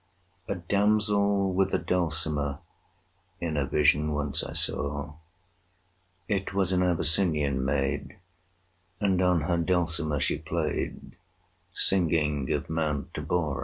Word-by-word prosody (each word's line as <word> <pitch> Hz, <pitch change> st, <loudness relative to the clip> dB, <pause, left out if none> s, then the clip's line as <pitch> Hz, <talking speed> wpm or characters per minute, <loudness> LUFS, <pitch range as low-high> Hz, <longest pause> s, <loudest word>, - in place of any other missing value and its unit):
[298:1] 100 Hz, -, -1 dB
A -, -, -8 dB
damsel 100 Hz, 0 st, +1 dB
with 95 Hz, +1 st, +1 dB
a -, -, +3 dB
dulcimer 80 Hz, -5 st, 0 dB, 0.8 s
In 85 Hz, -2 st, -3 dB
a 70 Hz, -2 st, 0 dB
vision 75 Hz, +1 st, +2 dB
once 75 Hz, -1 st, 0 dB
I -, -, -6 dB
saw: 70 Hz, 0 st, -2 dB, 1.1 s
It 95 Hz, -2 st, -2 dB
was 95 Hz, -2 st, +2 dB
an 90 Hz, -1 st, +2 dB
Abyssinian 80 Hz, -5 st, +2 dB
maid, 70 Hz, 0 st, -2 dB, 0.8 s
And 95 Hz, -2 st, +1 dB
on 90 Hz, -3 st, +2 dB
her 85 Hz, +3 st, 0 dB
dulcimer 85 Hz, -4 st, 0 dB
she -, -, +1 dB
played, -, -, -3 dB
40 -, -, -16 dB, 0.6 s
Singing 75 Hz, -7 st, +2 dB
of -, -, -2 dB
Mount 80 Hz, -3 st, -2 dB
Abora. 75 Hz, -6 st, -2 dB
80 Hz, 125 wpm, -27 LUFS, 75-95 Hz, 1.1 s, a